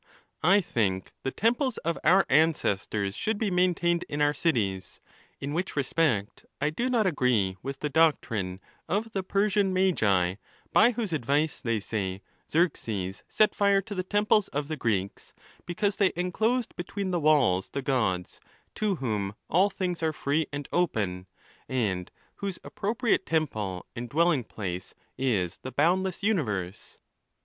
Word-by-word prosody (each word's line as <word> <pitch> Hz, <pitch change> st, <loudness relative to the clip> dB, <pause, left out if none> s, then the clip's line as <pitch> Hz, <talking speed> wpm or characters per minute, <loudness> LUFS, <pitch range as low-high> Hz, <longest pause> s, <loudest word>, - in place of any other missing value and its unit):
I 195 Hz, +6 st, +5 dB
think 95 Hz, -, -1 dB
the -, -, -1 dB
temples 235 Hz, -, +1 dB
of 170 Hz, 0 st, +1 dB
our 185 Hz, +5 st, +5 dB
ancestors 105 Hz, -9 st, +1 dB
should 220 Hz, 0 st, -1 dB
be 205 Hz, -2 st, -1 dB
maintained 175 Hz, -1 st, +2 dB
in 145 Hz, -, -3 dB
our 145 Hz, 0 st, +3 dB
cities. 105 Hz, -, -1 dB, 0.4 s
In 140 Hz, +2 st, -4 dB
which 180 Hz, +4 st, -2 dB
respect 135 Hz, -7 st, 0 dB, 0.2 s
I 150 Hz, +2 st, +1 dB
do 240 Hz, +11 st, -1 dB
not 235 Hz, -4 st, +2 dB
agree 125 Hz, -, +1 dB
with 135 Hz, +1 st, -6 dB
the 150 Hz, -, 0 dB
doc 160 Hz, +1 st, +4 dB
trine 95 Hz, -4 st, -4 dB, 0.3 s
of 215 Hz, +4 st, -1 dB
the 195 Hz, -, -1 dB
Persian 200 Hz, +1 st, +1 dB
Magi, 100 Hz, -, +2 dB, 0.4 s
by 230 Hz, +3 st, +6 dB
whose 220 Hz, -7 st, -3 dB
advice, 145 Hz, +2 st, 0 dB
they 115 Hz, -3 st, 0 dB
say, 100 Hz, -2 st, -3 dB, 0.3 s
Xerxes 110 Hz, -, -1 dB
set 215 Hz, -, +3 dB
fire 200 Hz, -1 st, +3 dB
to 205 Hz, -, -7 dB
the 185 Hz, -, -1 dB
temples 205 Hz, +2 st, +2 dB
of 145 Hz, +1 st, -3 dB
the 155 Hz, -, -1 dB
Greeks, 100 Hz, -7 st, -2 dB, 0.3 s
because 200 Hz, +3 st, 0 dB
they 195 Hz, -2 st, +3 dB
enclosed 220 Hz, +8 st, 0 dB
between 185 Hz, +2 st, -4 dB
the 175 Hz, -, +1 dB
walls 140 Hz, -, +3 dB
the 140 Hz, -, -4 dB
Gods, 105 Hz, -10 st, -1 dB, 0.3 s
to 210 Hz, -2 st, 0 dB
whom 105 Hz, -, -2 dB, 0.2 s
all 185 Hz, +5 st, +4 dB
things 180 Hz, -3 st, -3 dB
are 160 Hz, -1 st, +1 dB
free 150 Hz, +1 st, 0 dB
and 145 Hz, 0 st, -5 dB
open, 100 Hz, -, 0 dB, 0.4 s
and 100 Hz, -9 st, -1 dB, 0.3 s
whose 200 Hz, -2 st, -4 dB
appropriate 225 Hz, 0 st, 0 dB
temple 110 Hz, -, -1 dB
and 120 Hz, 0 st, -5 dB
dwelling 160 Hz, -3 st, +2 dB
"place 90 Hz, -4 st, -6 dB, 0.2 s
is 105 Hz, -10 st, 0 dB
the 130 Hz, -, -7 dB
boundless 185 Hz, +6 st, +1 dB
universe. 105 Hz, -, -2 dB
150 Hz, 150 wpm, -28 LUFS, -, 0.4 s, by